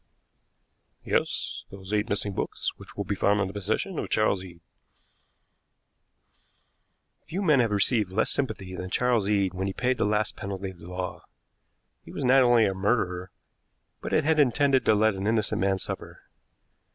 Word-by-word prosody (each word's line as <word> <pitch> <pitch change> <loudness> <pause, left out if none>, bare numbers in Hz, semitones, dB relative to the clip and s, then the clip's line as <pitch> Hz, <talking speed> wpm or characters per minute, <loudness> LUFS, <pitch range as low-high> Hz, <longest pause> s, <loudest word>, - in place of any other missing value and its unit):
"Yes; - - -2
those 95 +1 -9
eight 105 +2 0
missing 100 0 0
books, - - -2
which - - -14
will 100 - -1
be 100 - -2
found 100 +1 +2
in 100 - +1
the 95 - -6
possession 110 - -2
of - - -4
Charles 100 -3 +1
Eade." 85 -2 -12 2.7
Few 175 +4 -4
men 150 -7 +4
have 115 -2 +3
received 105 0 +2
less 95 - +1
sympathy 105 -9 -2
than 90 0 -5
Charles 120 -1 +1
Eade 100 -3 +1
when 95 +1 -3
he 95 - -3
paid 125 +3 0
the - - +2
last 105 0 0
penalty 95 -1 -5
of 90 - -17
the 85 - -12
law. 90 0 -5 0.8
He - - -12
was - - -4
not 130 +2 +6
only 120 -3 +5
a 95 - 0
murderer, 95 -3 -1 0.7
but - - -5
had 155 0 +2
intended 135 0 +3
to 110 - +5
let 110 +1 +3
an 95 +1 -3
innocent 110 -3 0
man 95 0 +2
suffer. - - -6
105 Hz, 170 wpm, -27 LUFS, 95-120 Hz, 2.7 s, not